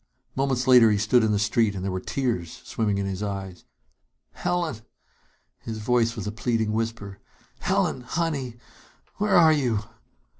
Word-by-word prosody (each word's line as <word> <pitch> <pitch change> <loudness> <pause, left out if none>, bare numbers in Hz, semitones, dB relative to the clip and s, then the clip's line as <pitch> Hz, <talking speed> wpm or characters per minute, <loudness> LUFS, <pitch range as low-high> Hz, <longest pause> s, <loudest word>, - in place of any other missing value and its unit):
Moments 130 -2 0
later 125 -3 +7
he 105 - +2
stood 110 +3 +3
in 110 - +2
the 105 - +2
street 105 +1 +1
and 95 - -5
there 100 - -1
were 95 - -2
tears 105 -8 -3
swimming 105 -3 -1
in 100 - -1
his 95 0 -4
eyes. 95 -3 -5 0.7
"Helen!" 170 -8 -2 0.8
His 110 -1 -6
voice 115 +1 +1
was - - -5
a 105 - -3
pleading 110 -1 -1
whisper. 110 -3 -3 0.4
"Helen, 185 -7 0
honey, 135 -3 -3 0.6
where 205 -1 +1
are 160 -2 +7
you?" 125 -8 0
115 Hz, 155 wpm, -25 LUFS, 105-130 Hz, 0.8 s, later